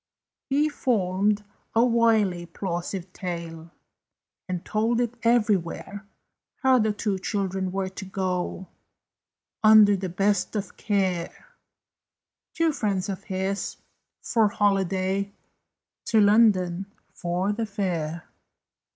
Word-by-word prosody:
He 290 +3 +3
formed 210 -7 0 0.3
a 230 +2 +5
wily, 220 -7 +2
plausive 175 +1 -4
tale, 170 -2 -6 0.8
And 180 -2 -3
told 225 +2 +1
it 240 -1 0
everywhere, 205 -3 0 0.6
How 260 -1 +5
the 215 -1 +2
two 210 -2 -2
children 190 -2 -2
were 190 0 -2
to 190 +1 -8
go, 185 -1 -3 0.9
Under 215 -1 +8
the 190 -1 -4
best 195 +4 0
of 200 -2 -4
care 190 - -2 1.1
Two 330 -1 +2
friends 200 -8 -1
of 190 -2 -5
his 190 0 -3 0.5
for 225 -3 +3
holiday 195 -1 0 0.7
To 225 - +3
London, 200 -4 +4 0.3
for 180 +3 -1
the 225 +1 -3
fair. 170 -6 -3
195 Hz, 105 wpm, -25 LUFS, 185-215 Hz, 1.1 s, Under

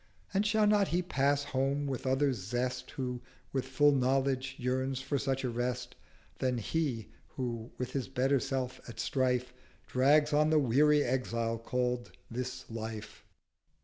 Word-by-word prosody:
600 - - -16
And 200 +2 +3
shall 215 0 +3
not 205 -2 +4
he 180 +2 0
pass 145 -4 +1
home 140 0 0
with 135 -2 -3
other 135 +1 +3
Zest 125 +4 -3
Who, 125 -2 -4 0.3
with 130 -1 -1
full 145 +3 +4
Knowledge, 135 0 +1
yearns 130 +1 -1
for 140 +1 -1
such 135 -1 -1
a 125 - 0
Rest, 120 +1 -2 0.5
Than 130 -1 +1
he, 120 -2 -1 0.2
who 120 -3 -4
with 125 - -3
his 135 -2 -2
better 135 +1 +2
self 130 -1 -3
at 110 -2 -9
strife, 125 0 0 0.3
Drags 145 +4 +4
on 150 +1 +4
the 155 - +4
weary 145 +2 +4
Exile 115 -2 -1
call'd 125 +1 -1 0.2
This 125 +1 -4
Life? 110 -1 -7
130 Hz, 155 wpm, -32 LUFS, 125-140 Hz, 0.5 s, not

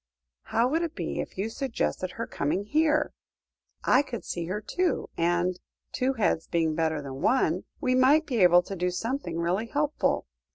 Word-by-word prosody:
"How 230 +2 +2
would 315 +6 +1
it 335 -1 -3
be - - -3
if - - -5
you 195 +3 -1
suggested 225 -6 -2
her 230 - -4
coming 185 +2 -1
here? 305 +6 +2 0.7
I 260 - +5
could 250 -5 -6
see 170 -1 -4
her 190 +4 -2
too, 355 - -1
and 175 +2 +1 0.3
two 260 +1 0
heads 195 -8 0
being 165 -2 +1
better 160 -2 0
than 135 -1 -7
one 260 +4 +2
we 255 -4 +1
might 270 +5 +5
be 255 -6 -2
able 175 0 +7
to 195 - -6
do 180 0 0
something 180 - -3
really 180 +7 0
helpful. 295 +4 0
210 Hz, 175 wpm, -27 LUFS, 175-265 Hz, 0.7 s, able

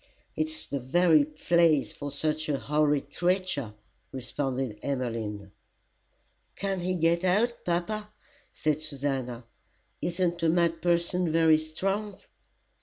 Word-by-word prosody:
"It's 315 0 -1
the 140 - -3
very 155 +4 +4
place 155 0 +2
for 145 - -6
such 155 +2 -2
a 145 - +1
horrid 150 -1 0
creature," 175 - 0 0.4
responded 130 -3 -3
Emmeline. 115 -7 -3 1.0
"Can't 195 -2 -2
he 185 +1 -1
get 170 +1 +2
out, 215 +6 +2
papa?" 210 +5 -2 0.4
said 155 0 -1
Susannah. 135 -5 -3 0.6
"Isn't 175 +1 -1
a 165 - +3
mad 170 -1 +2
person 175 0 +2
very 160 -1 +5
strong?" 195 +6 -3
155 Hz, 110 wpm, -28 LUFS, 140-175 Hz, 1.0 s, very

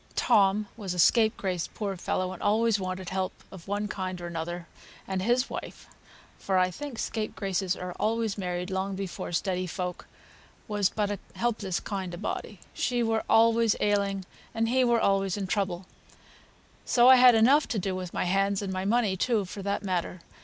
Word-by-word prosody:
Tom 210 -2 +3
was 195 -5 -4
a - - -6
scapegrace, 200 -4 +2
poor 200 -3 -3
fellow, 185 +1 -2
and 185 - -10
always 220 0 +2
wanted 185 0 -4
help 190 0 -1 0.2
of 190 -2 -12
one 205 +1 -1
kind 185 -3 -4
or 175 - -6
another; 170 0 -5 0.4
and 190 -1 -2
his 245 +6 +2
wife - - -7 0.5
(for 190 -1 0
I 185 0 +3
think 285 +4 -7
scapegraces 195 -5 -2
are 180 0 -6
always 225 -1 0
married 180 -1 -3
long 190 +1 -2
before 190 -2 -5
steady 185 +1 -1
folk) 180 +1 -5 0.6
was 205 -3 +1
but 205 -1 -1
a 205 - -3 0.2
helpless 215 -6 -1
kind 190 -4 -4
of 175 - -10
body. 205 -2 -4
She 245 -1 0
were 225 -1 0
always 230 0 +4
ailing, 200 -2 0 0.3
and 225 0 +1
he 255 +1 +3
were 240 -1 +3
always 195 -2 +1
in 200 - -2
trouble; 185 -2 -2 1.0
so 240 0 +4
I 260 0 +9
had 250 -1 +8
enough 270 +7 +5
to 225 - -2
do 190 -1 -1
with 185 -1 -5
my - - -1
hands 195 +2 +1
and 190 -1 -3
my 185 0 -2
money 215 -2 +2
too, 215 +1 +1
for 195 +2 -7
that 200 +1 -2
matter. 180 -2 -2
195 Hz, 180 wpm, -28 LUFS, 185-220 Hz, 1.0 s, I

